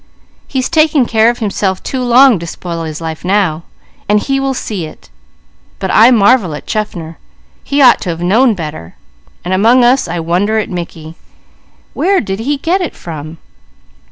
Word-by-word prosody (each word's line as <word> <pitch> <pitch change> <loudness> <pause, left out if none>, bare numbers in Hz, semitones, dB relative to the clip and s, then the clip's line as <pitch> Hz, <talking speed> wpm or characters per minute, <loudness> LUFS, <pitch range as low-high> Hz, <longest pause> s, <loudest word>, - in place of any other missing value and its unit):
He's 260 -2 -2
taken 310 -5 +2
care 225 0 +3
of 240 - -2
himself 200 -4 -2
too 260 - -3
long 250 -2 +5
to 170 - -7
spoil 165 0 -6
his 155 0 -6
life 160 -1 -6
now, 180 -4 0 0.5
and 210 0 +4
he 270 +5 -1
will 270 -1 -1
see 195 -10 -4
it; 80 - -16 0.7
but 190 -1 -3
I 225 +3 +7
marvel 215 -7 +3
at - - -9
Chaffner. 170 -7 -4 0.4
He 280 0 +1
ought 245 - +6
to 185 - -4
have 165 -1 -3
known 225 +6 +3
better. 155 - -7 0.5
And 180 - -1
among 230 +6 +4
us, 250 0 +3
I 170 +1 -3
wonder 180 +7 0
at 215 - -2
Mickey. 165 -2 -7 0.8
Where 385 +2 +1
did 195 -2 -4
he 280 +6 -1
get 345 +7 0
it 355 - -4
from?" 155 -1 -8
205 Hz, 175 wpm, -13 LUFS, 170-255 Hz, 0.8 s, I